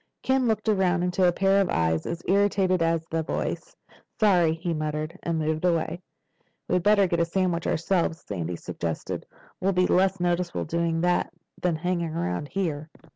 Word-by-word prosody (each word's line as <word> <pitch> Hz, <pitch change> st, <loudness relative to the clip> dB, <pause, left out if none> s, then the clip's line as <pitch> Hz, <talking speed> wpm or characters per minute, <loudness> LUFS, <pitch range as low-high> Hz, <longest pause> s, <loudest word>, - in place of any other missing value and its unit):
Ken 260 Hz, -1 st, +2 dB
looked 220 Hz, -1 st, 0 dB
around 190 Hz, -4 st, +2 dB
into 180 Hz, +1 st, +2 dB
a -, -, +4 dB
pair 195 Hz, +2 st, +3 dB
of 190 Hz, -, 0 dB
eyes 80 Hz, -1 st, 0 dB
as 170 Hz, 0 st, -4 dB
irritated 195 Hz, -2 st, +2 dB
as 165 Hz, -1 st, +1 dB
the 165 Hz, 0 st, -2 dB
voice. -, -, -4 dB, 0.4 s
"Sorry," 175 Hz, -7 st, +4 dB
he 170 Hz, +1 st, -3 dB
muttered, 155 Hz, +1 st, -3 dB
and 170 Hz, -1 st, -1 dB
moved 155 Hz, +1 st, -1 dB
away. 175 Hz, 0 st, 0 dB, 0.7 s
"We'd 180 Hz, -, +1 dB
better 205 Hz, +1 st, +4 dB
get 170 Hz, -2 st, 0 dB
a 170 Hz, -, +3 dB
sandwich 175 Hz, -1 st, -1 dB
ourselves," 170 Hz, -1 st, 0 dB
Sandy 90 Hz, -3 st, -4 dB
suggested. 85 Hz, -1 st, -5 dB, 0.3 s
"We'll 195 Hz, +1 st, +1 dB
be 180 Hz, 0 st, +3 dB
less 190 Hz, +1 st, +2 dB
noticeable 175 Hz, 0 st, -1 dB
doing 165 Hz, 0 st, 0 dB
that 175 Hz, 0 st, +1 dB, 0.3 s
than 175 Hz, -2 st, +1 dB
hanging 170 Hz, -1 st, -2 dB
around 90 Hz, -, -2 dB
here." 155 Hz, -4 st, -3 dB
175 Hz, 170 wpm, -26 LUFS, 160-185 Hz, 0.7 s, a